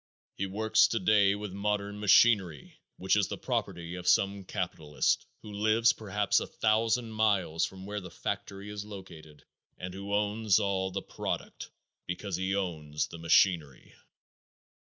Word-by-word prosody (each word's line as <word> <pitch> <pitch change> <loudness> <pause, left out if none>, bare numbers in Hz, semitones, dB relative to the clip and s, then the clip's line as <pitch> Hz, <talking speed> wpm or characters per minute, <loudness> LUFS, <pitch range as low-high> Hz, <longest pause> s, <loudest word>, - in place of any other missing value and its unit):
He 95 - -2
works 110 +3 +3
today 100 -2 +3
with 105 -2 -6
modern 100 0 -2
machinery 100 - +3 0.2
which - - +2
is - - +2
the - - -5
property 85 0 -3
of 90 0 -7
some 100 +1 +2
capitalist 80 -6 -1 0.2
who 105 - -9
lives 110 +3 +3
perhaps 105 -2 0
a - - -5
thousand 115 +2 +1
miles 100 -7 +1
from 95 0 -9
where 105 +1 -4
the 90 - -9
factory 100 +4 -5
is 105 -1 -5
located 90 -7 -12 0.3
and 90 0 -6
who 100 +1 -7
owns 105 0 +2
all 95 -1 0
the - - -4
product - - -5 0.4
because 90 +2 -4
he 95 +2 -1
owns 75 -6 -3
the 85 - -9
machinery. 80 -4 +2
100 Hz, 145 wpm, -30 LUFS, 90-105 Hz, 0.4 s, works